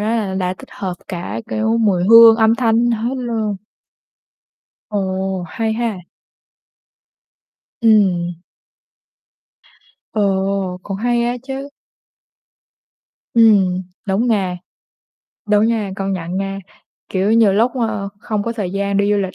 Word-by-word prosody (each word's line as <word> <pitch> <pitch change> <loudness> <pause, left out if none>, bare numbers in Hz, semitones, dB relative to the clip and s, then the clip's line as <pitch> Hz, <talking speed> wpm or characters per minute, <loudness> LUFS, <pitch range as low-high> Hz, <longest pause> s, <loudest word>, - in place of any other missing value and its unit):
là 215 -4 -1
đã 185 -1 -1
tích - - -13
hợp 185 -2 -4
cả, 170 - -5
kiểu, 220 +1 0
mùi 190 -5 +2
hương, 230 +2 +8
âm 220 0 +4
thanh 235 0 +2
hết 235 +3 -1
luôn. 225 -5 -2 1.3
Ồ, 190 -2 -2
hay 220 +6 -2
ha. 225 -3 -2 1.8
Ừm. 180 -6 +2 1.7
Ồ, 195 -2 0
cũng 195 -1 -5
hay 240 +2 0
á 240 +1 -1
chứ. 270 +1 -6 1.6
Ừm, 205 -6 +4 0.3
đúng 200 +5 +1
nha. 190 -6 0 0.9
Đúng 210 +1 +4
nha, 225 -4 -1
công 195 0 -2
nhận 175 -1 -4
nha, 195 0 -3 0.5
kiểu, 195 +3 0
nhiều 225 -3 +5
lúc, 230 +5 +2
ờ, 220 -5 -2
không 215 -3 -2
có 230 - -3
thời 205 -6 -4
gian 200 0 -1
đi 200 +1 +2
du - - +2
lịch 190 -2 -3
205 Hz, 125 wpm, -18 LUFS, 190-230 Hz, 1.8 s, hương